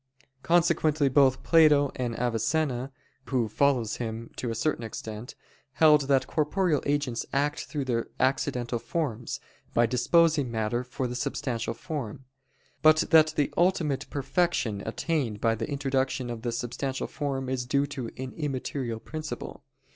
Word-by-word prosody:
Consequently 160 -4 +3
both 135 -1 +4
Plato 150 -4 +5
and 120 -2 -3
Avicenna, 125 +3 0 0.3
who 120 -1 0
follows 125 -1 +1
him 115 -1 -5
to 120 - -3
a 115 - -2
certain 130 +1 -1
extent, 110 +1 -7 0.4
held 150 -1 +5
that 135 -2 +3
corporeal 155 +1 +1
agents 145 -5 0
act 145 +2 0
through 145 -4 -3
their 115 -3 -1
accidental 130 -2 0
forms, 120 -2 -3 0.4
by 120 - +5
disposing 145 +4 +3
matter 115 +2 -1
for 125 +1 -4
the 125 - -3
substantial 125 -2 -2
form; 135 - -6 0.6
but 155 0 +7
that 155 -1 +6
the 145 - 0
ultimate 170 -6 +1
perfection 135 - 0
attained 120 -3 -1
by 115 +1 +2
the 115 - -4
introduction 135 -3 -1
of 115 -1 -6
the 120 0 -2
substantial 125 +3 -3
form 135 -3 -3
is 130 -1 -2
due 140 +2 +2
to 135 -5 -5
an 130 0 -5
immaterial 130 -5 -3
principle. 155 +5 -6
135 Hz, 140 wpm, -27 LUFS, 120-150 Hz, 0.6 s, but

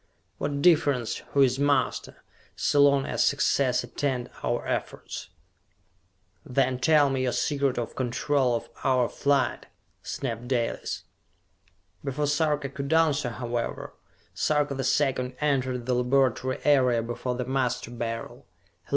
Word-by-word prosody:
What 140 0 -2
difference 145 -9 +3 0.2
who 140 - +4
is 130 0 +2
master, 145 0 0 0.3
so 145 - +2
long 140 -1 +4
as - - 0
success 130 -3 +2
attend 125 0 -3
our - - -1
efforts?" - - -4 1.1
"Then 130 -1 0
tell 145 0 +4
me 135 -1 0
your 130 -1 +1
secret 140 +1 0
of 120 -2 -4
control 130 0 +1
of 115 - -4 0.2
our 130 -2 +3
flight!" 140 -1 0 0.3
snapped 120 -2 -4
Dalis. 120 -3 -2 1.0
Before 145 +1 -1
Sarka 150 -1 0
could 140 +2 -5
answer, 155 -5 +3
however, 120 0 -4 0.4
Sarka 150 -1 +1
the 135 0 -3
Second 130 -1 +1
entered 130 -4 0
the 125 - 0
laboratory 130 +1 +1
area 130 -5 +3
before 120 +2 -3
the 125 0 -3
Master 130 -2 -1
Beryl. 115 -1 -5
130 Hz, 125 wpm, -26 LUFS, 125-140 Hz, 1.1 s, who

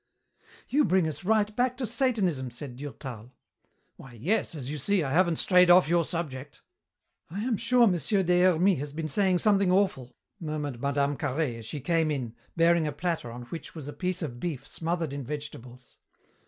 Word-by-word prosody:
"You 295 +2 +3
bring 185 - +2
us 155 +4 -5
right 210 +1 +1
back 250 0 +1
to 260 - -2
Satanism," 210 - 0
said 120 +1 -9
Durtal. 130 -4 -8 0.6
"Why, 135 - -13
yes, 170 - -1
as 140 -2 -5
you 150 - -4
see, 195 +5 +1
I 135 - -3
haven't 170 +2 +3
strayed 180 +1 +4
off 175 -1 +7
your 170 +1 +3
subject." 150 -5 -5 0.7
"I 195 +6 -4
am 245 -1 0
sure 240 +3 +4
Monsieur 190 - +1
Des 180 0 +3
Hermies 185 -1 +4
has 145 0 -5
been 160 +1 -3
saying 185 +4 +2
something 200 -1 +3
awful," 180 -11 0 0.2
murmured 150 -6 -4
Mme. 140 0 0
Carhaix 135 -3 -2
as 115 - -10
she 145 - -5
came 165 +2 +1
in, 130 -6 -3 0.2
bearing 165 -1 +4
a - - -1
platter 160 -4 -3
on 120 +1 -8
which 165 +8 -8
was 150 -4 -7
a 145 - -6
piece 180 -1 -2
of 120 -6 -5
beef 145 -5 -4
smothered 165 -2 -3
in 140 -1 -4
vegetables. 125 -3 -8
160 Hz, 185 wpm, -28 LUFS, 140-185 Hz, 0.7 s, off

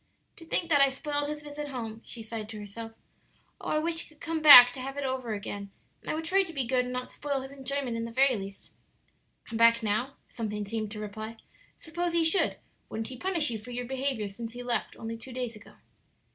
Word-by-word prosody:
"To 330 - -11
think 340 +1 -1
that 290 -2 +6
I 275 - +7
spoiled 290 +2 -2
his 300 0 -5
visit 295 0 -6
home," 225 -5 -5
she 230 - -7
sighed 220 -1 -6
to 220 - -7
herself. 225 +2 -8 0.7
"Oh, - - -5
I - - +2
wish 330 +1 0
he - - -10
could 310 -1 -21
come 325 -1 -2
back 250 -5 +11
to 260 - -8
have 270 +2 -5
it 285 - -2
over 255 -4 -2
again, 200 0 -6 0.3
and - - -9
I - - 0
would 320 +1 -4
try 380 +4 +4
to 365 -3 -4
be 270 -4 -1
good 250 +1 +2
and 250 - -5
not 250 0 -4
spoil 280 -2 -2
his 265 +1 -8
enjoyment 275 -2 -3
in 230 0 -2
the 230 - -6
very 265 +2 +4
least!" 195 -1 -8 0.7
"Come 225 - -5
back 230 0 +6
now?" 220 +6 0
something 210 -2 -4
seemed 215 +1 -3
to 210 - -6
reply; 215 +2 -6 0.4
"suppose 345 +1 -3
he 335 -1 +3
should; 325 +4 +3 0.3
wouldn't 225 +1 -4
he 260 - -7
punish 335 -3 +1
you 225 - -3
for 220 +4 -12
your 245 0 -3
behavior 260 -4 -1
since 225 +3 -7
he 245 0 -7
left, 245 -1 -1
only 230 0 -5
two 255 +2 -10
days 245 -2 -3
ago?" 215 - -15
250 Hz, 235 wpm, -29 LUFS, 225-290 Hz, 0.7 s, back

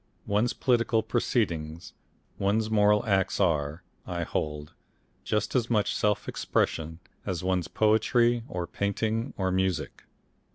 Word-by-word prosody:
One's 105 +4 +1
political 115 -3 +2
proceedings, 80 0 -1 0.5
one's 110 +3 +1
moral 105 -1 +4
acts 95 -2 +1
are, 80 -3 +1 0.2
I 85 -1 -2
hold, 75 -2 -3 0.5
just 105 -1 -1
as 120 -3 +1
much 105 -3 +2
self 105 -1 0
expression 80 0 -1 0.3
as 90 -2 -3
one's 90 -2 0
poetry 115 +4 +3
or 90 -1 -3
painting 110 +6 -2
or 95 -1 0
music. 95 -2 -1
100 Hz, 120 wpm, -28 LUFS, 85-110 Hz, 0.5 s, moral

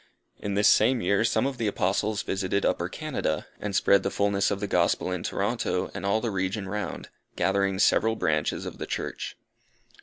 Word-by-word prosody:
In 100 -1 -3
this 105 +1 +4
same 120 +4 +5
year, 100 +2 +2
some 115 +2 +2
of 135 -2 -3
the 115 - 0
Apostles 100 +1 0
visited 95 +1 -1
Upper 85 +1 0
Canada, 130 - -2
and 100 -2 -4
spread 100 0 +4
the 100 - -1
fulness 100 0 +1
of 100 - -2
the 100 - -2
Gospel 90 -1 +1
in 90 -2 -2
Toronto - - -1
and 100 - -4
all 105 +3 +2
the 115 - -1
region 95 +1 -2
round, 105 +2 -4 0.3
gathering 95 +1 +1
several 110 +3 +3
Branches 75 -7 0
of - - -7
the - - -4
Church. - - -4
100 Hz, 185 wpm, -27 LUFS, 95-105 Hz, 0.3 s, same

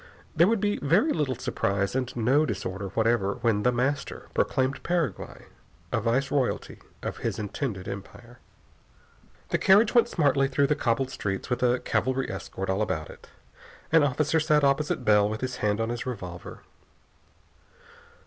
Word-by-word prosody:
There 170 +2 +5
would 225 0 +2
be 205 +1 0
very 185 - +3
little 140 -5 -1
surprise 100 -4 -1
and 130 -1 -1
no 125 +6 +3
disorder 100 -5 -3
whatever 110 -3 +2
when 115 -4 +2
The 125 - +3
Master 130 +4 -2
proclaimed 130 +1 0
Paraguay 170 -5 -2 0.5
a 110 - 0
viceroyalty 130 +3 -1 0.2
of - - -4
his - - -3
intended 105 -2 -4
empire. 120 +5 -9 1.1
The - - 0
carriage 210 +3 +5
went 235 -1 +4
smartly 140 - +2
through 140 +1 +2
the 150 - +1
cobbled 130 0 0
streets 100 +2 -4
with 125 - 0
a 125 0 +2
cavalry 130 +4 -1
escort 95 0 -6
all 95 +2 0
about 80 -7 -2
it. - - -16 0.6
An 165 0 +6
officer 145 +3 +1
sat 150 -1 +2
opposite 140 +2 +1
Bell 105 -1 +4
with 110 0 -4
his 130 -1 -3
hand 105 0 0
on 115 0 -1
his 120 +1 -4
revolver. 90 -8 -7
125 Hz, 155 wpm, -27 LUFS, 105-145 Hz, 1.1 s, An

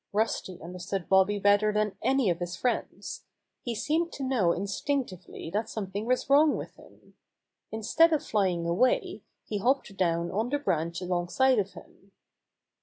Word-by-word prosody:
Rusty 205 -4 -1
understood 180 +2 -5
Bobby 190 +2 +4
better 205 +1 +4
than 210 -1 0
any 265 -8 +2
of 170 - -3
his 175 0 -4
friends. 250 - -3 0.4
He 240 -2 -3
seemed 320 +9 0
to 275 - -5
know 245 -10 +2
instinctively 195 - -3
that 215 +3 -1
something 205 +1 -4
was 255 0 +1
wrong 290 +2 +5
with - - -8
him. - - -19 0.6
Instead 225 +10 +3
of 310 - +1
flying 185 -5 0
away, 180 +10 +1 0.2
he 210 - -3
hopped 245 -2 0
down 170 -2 0
on 220 +5 -1
the 290 - +1
branch 170 - -1
alongside 180 +8 +2
of 200 -1 -2
him. 195 0 -16
205 Hz, 155 wpm, -28 LUFS, 180-255 Hz, 0.6 s, wrong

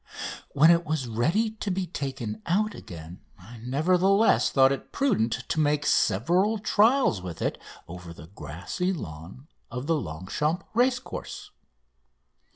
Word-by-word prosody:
When 155 +4 +6
it 170 0 +3
was 155 -5 -2
ready 165 - +1
to 215 -2 -5
be 190 0 -1
taken 125 -10 -5
out 210 +5 +1
again 85 +1 -10 0.2
I 110 +6 -13
nevertheless 180 - +3
thought 135 -1 +5
it 140 - -4
prudent 125 - 0
to - - 0
make 150 -1 +1
several 175 - +2
trials 215 - +3
with 90 -3 -7
it - - -2 0.3
over 90 0 -9
the 85 -2 -11
grassy 90 - -4
lawn 90 - -9 0.2
of 125 +3 -5
the 165 +2 +2
Longchamps 140 - -3
racecourse. 250 +2 -1
145 Hz, 135 wpm, -26 LUFS, -, 0.3 s, When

